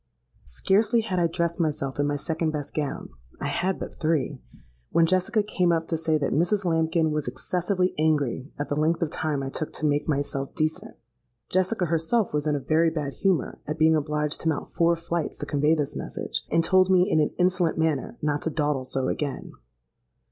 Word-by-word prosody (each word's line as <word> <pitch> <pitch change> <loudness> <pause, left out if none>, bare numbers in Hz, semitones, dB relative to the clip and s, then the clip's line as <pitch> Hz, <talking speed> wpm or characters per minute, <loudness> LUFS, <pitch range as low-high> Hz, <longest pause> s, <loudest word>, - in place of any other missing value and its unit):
Scarcely 210 - +2
had 195 -5 -2
I 170 - +3
dressed 170 +1 -2
myself 145 -4 -1
in 145 - +2
my 145 - 0
second 160 +2 -1
best 150 -2 -4
gown 145 -3 -3 0.3
(I - - -2
had 190 +1 0
but - - -7
three)—when 65 - -1
Jessica 185 +5 +2
came 180 -4 +1
up 165 -1 0
to 165 - +1
say 160 -1 +1
that 140 -2 -1
Mrs. 185 +5 +1
Lambkin 160 -1 +2
was 150 -3 -2
excessively 180 +8 -1
angry 145 -4 +1
at 145 - -3
the 145 - -1
length 160 +3 +1
of 155 - -2
time 150 -3 -1
I 135 - -3
took 155 +3 -4
to 155 - -3
make 145 +1 +1
myself 140 -1 -2
decent. 170 +7 -2 0.5
Jessica 185 +1 +1
herself 170 +6 +1
was 150 0 0
in 150 - +2
a - - -1
very 160 +4 +2
bad 150 -4 -3
humour 190 -5 0
at 150 +1 -3
being 160 0 +5
obliged 150 0 -1
to 165 - +1
mount 150 - -3
four 170 0 +3
flights 170 -1 -3
to 145 - -4
convey 150 +2 +2
this 145 -3 -2
message, - - -4
and 165 - +2
told 185 +2 +4
me 185 -1 +5
in 160 - +2
an 150 - +1
insolent 180 -2 +2
manner 160 -4 0
not 150 -1 0
to - - -1
dawdle 145 -4 -1
so 130 0 -1
again. 145 -2 -3
160 Hz, 200 wpm, -26 LUFS, 145-175 Hz, 0.5 s, being